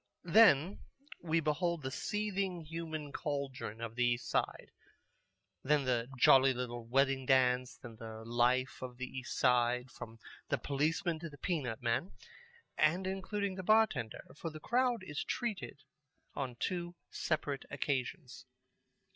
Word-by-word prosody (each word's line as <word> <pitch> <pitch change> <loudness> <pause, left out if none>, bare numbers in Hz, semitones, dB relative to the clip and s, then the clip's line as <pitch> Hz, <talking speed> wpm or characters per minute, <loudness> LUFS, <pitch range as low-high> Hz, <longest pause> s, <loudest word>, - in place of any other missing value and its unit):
Then 185 -2 +5 0.4
we 165 -1 +1
behold 160 +1 0
the 130 - -3
seething 195 0 -2
human 160 -2 -5
cauldron 140 -7 -4
of 115 -1 -4
the 125 +1 0
East 120 -2 +1
Side, - - -1 0.9
then 145 +1 +3
the 125 -2 0
jolly 130 +1 +6
little 120 -2 -4
wedding 135 +1 +2
dance, 125 -1 +3
then 115 -3 -11
the 110 0 -8
life 120 +2 +1
of 125 -1 -6
the 130 - -3
East 130 0 -6
Side, 125 0 +2
from 115 0 -9 0.3
the - - +2
policeman 160 +4 0
to 165 0 -6
the 145 - -13
peanut 135 - -2
man, 120 +10 0 0.7
and 170 +5 +3
including 195 +1 -2
the 185 - -5
bar 215 +4 +6
tender, 120 - -6
for 165 - -5
the 155 0 -9
crowd 245 - +1
is 145 -6 -4
treated 215 - -4 0.5
on 130 -3 -4
two 175 -1 -2 0.2
separate 145 -3 -2
occasions. 130 -1 -3
140 Hz, 140 wpm, -34 LUFS, 125-170 Hz, 0.9 s, jolly